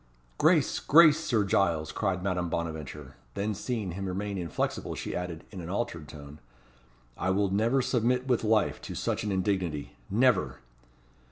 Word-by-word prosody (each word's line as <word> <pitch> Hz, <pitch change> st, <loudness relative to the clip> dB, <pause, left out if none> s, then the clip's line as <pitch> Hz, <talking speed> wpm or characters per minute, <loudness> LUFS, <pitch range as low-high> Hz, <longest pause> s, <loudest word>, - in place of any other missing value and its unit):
"Grace! -, -, +3 dB
grace! 155 Hz, 0 st, +6 dB
Sir 115 Hz, -9 st, +1 dB
Giles," 85 Hz, -5 st, +1 dB
cried 95 Hz, -4 st, -1 dB
Madame 90 Hz, -3 st, -1 dB
Bonaventure. 80 Hz, -4 st, -5 dB, 0.2 s
Then 105 Hz, +2 st, -1 dB
seeing 105 Hz, -2 st, -3 dB
him 95 Hz, +3 st, -4 dB
remain 100 Hz, +2 st, -3 dB
inflexible, 85 Hz, -3 st, -3 dB
she -, -, -5 dB
added, 90 Hz, -2 st, -4 dB
in 95 Hz, -4 st, -7 dB
an 85 Hz, -, -7 dB
altered 90 Hz, -6 st, -3 dB
tone, 75 Hz, 0 st, -11 dB, 0.8 s
"I 95 Hz, -, -2 dB
will 100 Hz, 0 st, +1 dB
never 115 Hz, +6 st, +2 dB
submit 125 Hz, +1 st, +1 dB
with 125 Hz, -3 st, +1 dB
life 110 Hz, -1 st, +2 dB
to -, -, -7 dB
such -, -, -2 dB
an 105 Hz, -, -2 dB
indignity 95 Hz, -6 st, -1 dB
never!" 115 Hz, -1 st, +2 dB
95 Hz, 155 wpm, -29 LUFS, 85-110 Hz, 0.8 s, grace